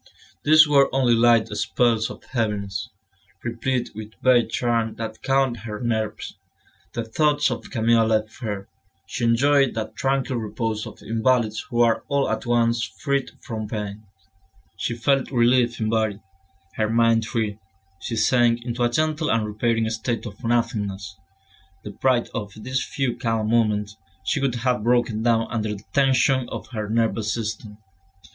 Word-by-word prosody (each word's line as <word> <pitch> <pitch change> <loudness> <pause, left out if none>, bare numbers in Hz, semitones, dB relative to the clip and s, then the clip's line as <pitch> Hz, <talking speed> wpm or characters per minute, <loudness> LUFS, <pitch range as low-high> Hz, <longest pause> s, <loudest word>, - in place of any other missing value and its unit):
These 155 +1 +7
were 140 -2 +5
only 130 -3 +3
light 115 -1 +4
spells 115 -3 +1
of - - -10
heaviness, 105 -5 -2 0.5
replete 120 +2 -2
with 110 0 -9
vague 125 -2 +4
charm 115 -2 0
that 110 -1 -6
calmed 135 -2 +1
her 105 -1 -7
nerves. 110 -3 -3 0.5
The 115 - -3
thoughts 145 +4 +2
of 120 - -5
Camille 115 -2 +3
left 110 0 -1
her; 105 -4 -4 0.4
she 120 +5 -3
enjoyed 135 +3 +3
that 110 -1 -4
tranquil 135 -1 0
repose 110 0 -3
of - - -12
invalids 115 -1 +1
who 120 -2 +1
are 115 -1 +3
all 140 -1 +1
at - - -3
once 115 -1 +2
freed 140 +3 -2
from 110 -2 -5
pain. 105 -1 -5 0.7
She 120 - -3
felt 135 +3 +1
relieved 120 -1 +2
in 110 -1 0
body, 110 -3 0 0.6
her 110 -1 +1
mind 115 -1 +3
free, 110 -3 -2 0.4
she 115 - -4
sank 120 +1 +2
into 120 0 -3
a 120 - +3
gentle 155 +4 0
and 115 -1 +2
repairing 110 +1 0
state 115 0 -2
of 105 -3 -9
nothingness. 105 -5 -1 0.7
Deprived 120 +4 0
of 105 -1 -5
these 130 +4 -2
few 135 -3 -2
calm 115 -2 -1
moments, 105 -2 +1 0.3
she 85 - 0
would 135 -3 0
have 125 -3 +2
broken 120 -2 +2
down 115 -1 +2
under 110 -2 -2
the 100 - -12
tension 130 -1 +3
of - - -7
her 110 -4 -4
nervous 115 -1 0
system. 110 -2 -4
115 Hz, 150 wpm, -23 LUFS, 110-125 Hz, 0.7 s, These